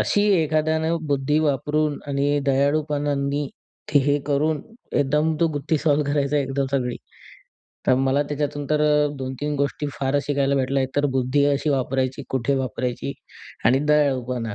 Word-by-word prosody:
अशी 205 - +2 0.2
एखाद्यानं 160 +1 +1
बुद्धी 145 +1 +1
वापरून 150 0 0
आणि 145 +1 +1
दयाळूपणांनी 145 0 0 0.4
ते 145 - +6
हे 145 +1 +2
करून, 150 +1 +1 0.3
एकदम 150 +3 +2
तो 170 - +5
गुत्ती 145 +2 -1
सॉल्व्ह 145 -1 +1
करायचा 145 0 +1
एकदम 135 0 -1
सगळी. 125 -3 -1 0.9
तर - - +5
मला 135 +2 +2
त्याच्यातून 145 0 -2
तर 150 0 +2 0.4
2-3 130 +3 -3
गोष्टी 140 +1 -1
फारच 140 +1 -1
शिकायला 140 -1 +1
भेटल्या. 135 0 +1
एकतर 145 +2 0
बुद्धी 130 +3 +2
अशी 145 +1 +1
वापरायची, 130 0 -1
कुठे 130 +1 0
वापरायची? 125 +1 -3 0.5
आणि 125 +3 +5
दयाळूपणा. 130 -6 +1
140 Hz, 135 wpm, -23 LUFS, 135-150 Hz, 0.9 s, ते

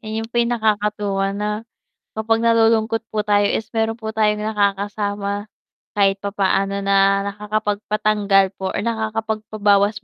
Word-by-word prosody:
'yon 220 0 -4
pa 240 - +2
'yong 235 0 +1
nakakatuwa 205 -2 0
na 210 +1 -2 0.6
kapag 225 +1 0
nalulungkot 225 -1 +3
po 215 -1 -2
tayo 205 -1 +3
is 220 - -2
meron 225 0 0
po 220 -1 -6
tayong 210 -1 +1
nakakasama, 205 0 -1 0.5
kahit 195 -1 +2
papaano 200 0 0
na 195 0 +3
nakakapagpatanggal 210 -1 +1
po 190 - -3
or - - -1
nakakapagpabawas 215 -2 0
210 Hz, 125 wpm, -20 LUFS, 200-220 Hz, 0.6 s, nalulungkot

